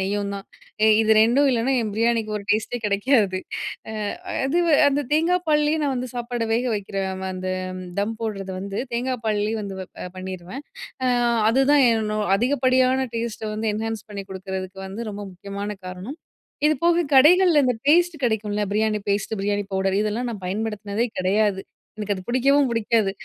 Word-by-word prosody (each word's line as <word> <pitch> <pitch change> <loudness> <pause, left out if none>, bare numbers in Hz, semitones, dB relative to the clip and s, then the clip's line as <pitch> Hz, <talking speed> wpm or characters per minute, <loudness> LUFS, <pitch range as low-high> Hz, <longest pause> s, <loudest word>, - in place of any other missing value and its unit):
நெய்யும் 200 +1 -1
தான். 195 - -7 0.4
எ - - +6
இது 220 0 +4
ரெண்டும் 250 +6 +4
இல்லன்னா, 245 +2 +1
என் 220 - -2
பிரியாணிக்கு 230 -1 +1
ஒரு 200 - -6
டேஸ்ட்டே 215 +3 0
கிடைக்காது. 205 -1 +2 0.5
அ - - -6 0.5
அதுவு 335 +3 +2 0.2
அந்த 285 +1 0
தேங்கா 330 +4 +3
பால்லேயே 300 +1 +2
நான் 275 -2 0
வந்து 250 0 -3
சாப்பாட 240 -1 -3
வேக 235 +2 +1
வைக்கிற 200 -1 -5 0.3
ம - - -3
அந்த 185 0 -4 0.5
தம் 210 +3 0
போடுறத 195 -4 -4
வந்து 200 +1 -5
தேங்காய் 250 0 -1
பால்லயே 215 +1 0
வந்து 195 -1 -6
வப் 185 - -10
அ - - -4
பண்ணிருவேன். 185 +8 -7 0.4
அ 255 - +3 0.4
அதுதான் 270 +3 +4
என்னோ 215 -1 -1 0.2
அதிகப்படியான 255 +1 +2
டேஸ்ட்ட 230 -1 -3
வந்து 220 +1 -2
என்ஹான்ஸ் 225 0 -4
பண்ணி 200 -1 -6
கொடுக்குறதுக்கு 190 0 -6
வந்து 215 +4 -6
ரொம்ப 205 0 -6
முக்கியமான 200 +3 -6 0.2
காரணம். 190 - -7 0.5
இதுபோக 335 +2 +2
கடைகள்ல 330 +2 +6
இந்த 250 -2 +1
பேஸ்ட்டு 340 -2 +3
கிடைக்கும்ல. 210 -2 -1
பிரியாணி 215 0 +1
பேஸ்ட்டு, 205 +2 -1
பிரியாணி 205 0 0
பவுடர் 190 +1 +1
இதெல்லாம் 220 +4 -2
நான் 195 -4 -8
பயன்படுத்தினதே 210 +2 -2
கிடையாது. 195 +1 +1 0.3
எனக்கு 210 -1 -2
அது 185 - -7
பிடிக்கவும் 275 +3 +3
பிடிக்காது. 225 -3 +1
220 Hz, 160 wpm, -23 LUFS, 200-260 Hz, 0.5 s, எ